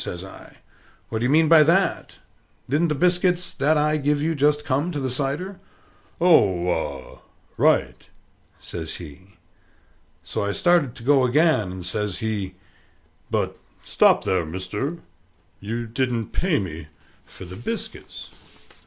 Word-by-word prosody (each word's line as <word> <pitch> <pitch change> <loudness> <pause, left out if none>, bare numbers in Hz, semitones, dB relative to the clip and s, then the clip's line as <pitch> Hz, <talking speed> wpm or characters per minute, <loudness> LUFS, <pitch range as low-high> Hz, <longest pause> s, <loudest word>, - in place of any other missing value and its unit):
says 90 +2 -5
I. 95 - -14 0.5
"What 110 - -2
do 120 - -1
you - - +1
mean 160 +3 +4
by 160 0 +7
that? 170 +6 +1 0.5
Didn't 150 +6 +2
the 150 - -1
biscuits 180 +2 +1
that 150 +3 +2
I 150 +1 +2
give 145 0 +1
you 160 +3 0
just 150 0 +1
come 145 +6 0
to 150 - -3
the 130 -2 -2
cider?" 145 +9 -2 0.6
"Oh, 100 - +4
ah, 70 -6 -4 0.3
right!" 60 0 +1 0.5
says 80 -2 -6
he. 90 +4 -12 0.9
So - - -3
I 100 0 -1
started 170 - +2
to 115 - -11
go 135 +1 +4
again, 145 - +2
and 90 -1 -7
says 105 0 -2
he, 100 -4 -3 0.7
"But - - -1 0.3
stop - - +3
there, 90 -2 +1
mister: 95 - -4 0.6
you 115 +4 -4
didn't 115 -1 -2
pay 180 -4 +1
me 80 -4 -5 0.4
for - - -12
the 90 +1 -9
biscuits." 225 - -7
130 Hz, 145 wpm, -23 LUFS, 95-155 Hz, 0.9 s, by